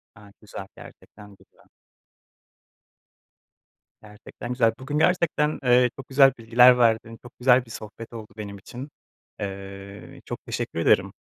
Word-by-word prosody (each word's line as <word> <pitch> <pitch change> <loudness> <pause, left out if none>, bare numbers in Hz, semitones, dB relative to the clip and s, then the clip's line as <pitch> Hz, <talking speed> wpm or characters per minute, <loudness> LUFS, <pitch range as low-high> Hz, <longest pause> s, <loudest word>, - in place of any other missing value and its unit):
Gayet 105 -3 -17
güzel. 95 -3 -9
Gerçekten 105 -1 -15
güzel. - - -26 2.4
Gerçekten 105 +3 -11
güzel. 120 -3 +2
Bugün 135 +3 -4
gerçekten, 160 -4 +1
eee, 125 0 +4
çok 135 - -10
güzel 135 0 +6
bilgiler 125 +2 +6
verdin. 115 -1 +1
Çok 120 - -16
güzel 125 0 +4
bir 115 - -14
sohbet 110 +1 -10
oldu 110 -2 -8
benim 100 -1 -7
için. 125 +8 -9 0.5
Eee, 100 0 -8
çok - - -7
teşekkür - - -4
ederim. - - +2
115 Hz, 130 wpm, -24 LUFS, 105-125 Hz, 2.4 s, güzel